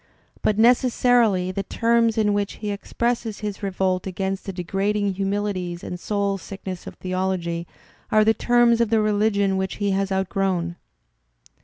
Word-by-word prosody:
But 210 - +1
necessarily 235 -5 +3
the 195 - -2
terms 230 +2 +1
in 210 -2 +2
which 205 0 -1
l - - -19
he 210 -1 -2
expresses 230 +2 -2
his 210 -1 -4
revolt 190 -1 -1
against 190 +1 -3
the - - -2
degrading 195 +3 -1
humilities 195 -3 -2
and 180 - -5
soul 200 0 -1
sickness 190 -1 -7
of - - -8
theology 185 -2 -2 0.4
are 215 0 +5
the 220 - +5
terms 240 +1 +3
of 230 - +2
the 225 0 +3
religion 205 -2 +2
which 190 0 -2
he 205 -1 -1
has 195 0 0
outgrown. 190 -2 -1
200 Hz, 155 wpm, -23 LUFS, 190-215 Hz, 0.4 s, are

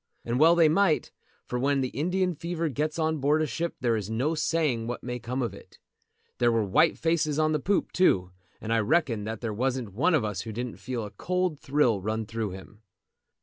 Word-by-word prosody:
And 120 +2 -1
well 165 +3 +6
they 165 -2 +6
might, 165 0 +2 0.3
for 125 - -3
when 140 +1 +1
the 130 - -1
Indian 180 +6 0
fever 170 +1 -3
gets 150 +4 -2
on 160 -1 0
board 145 +3 +2
a - - +1
ship 165 +3 -3
there 120 -2 +2
is 105 -2 -3
no 125 +8 0
saying 150 -7 0
what 120 - -5
may 125 0 -4
come 125 +3 -3
of 120 - -3
it. - - -14 0.6
There 120 -1 +4
were 115 -1 +2
white 130 - +3
faces 160 -2 +1
on 155 0 +2
the 155 - +1
poop 195 +7 0
too, 95 - +2 0.3
and 115 +1 -2
I 115 - +3
reckon 115 -3 +1
that 110 0 -5
there 115 -3 -3
wasn't 125 -2 -2
one 160 - +2
of 130 -8 +1
us 105 -4 -3
who 110 - -6
didn't 120 +2 -5
feel 125 -3 -4
a 105 - -7
cold 180 -4 -1
thrill 130 -9 +1
run 110 +2 -2
through 115 -1 -3
him. 95 +3 -11
130 Hz, 220 wpm, -27 LUFS, 115-160 Hz, 0.6 s, well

